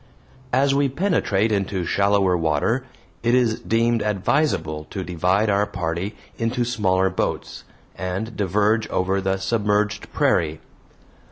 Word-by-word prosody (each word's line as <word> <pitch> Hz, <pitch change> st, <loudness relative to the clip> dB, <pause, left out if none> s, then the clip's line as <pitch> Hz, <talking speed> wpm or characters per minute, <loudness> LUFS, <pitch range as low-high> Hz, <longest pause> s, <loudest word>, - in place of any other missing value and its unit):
As 135 Hz, +2 st, +3 dB
we 140 Hz, 0 st, +2 dB
penetrate 130 Hz, -, +1 dB
into 95 Hz, -3 st, -1 dB
shallower 100 Hz, -1 st, +2 dB
water, 85 Hz, -, 0 dB, 0.3 s
it 120 Hz, +1 st, +2 dB
is 120 Hz, -3 st, +2 dB
deemed 115 Hz, 0 st, +1 dB
advisable 95 Hz, -, 0 dB
to 95 Hz, -, -5 dB
divide 90 Hz, +4 st, +1 dB
our 100 Hz, 0 st, +2 dB
party 90 Hz, +1 st, -3 dB, 0.2 s
into 120 Hz, +1 st, 0 dB
smaller 95 Hz, -5 st, +1 dB
boats, 95 Hz, -, -3 dB, 0.3 s
and 95 Hz, +5 st, -4 dB
diverge 105 Hz, +3 st, +1 dB
over 95 Hz, +1 st, 0 dB
the 95 Hz, 0 st, 0 dB
submerged 105 Hz, +1 st, 0 dB
prairie. 80 Hz, -2 st, +1 dB
100 Hz, 120 wpm, -22 LUFS, 95-115 Hz, 0.3 s, As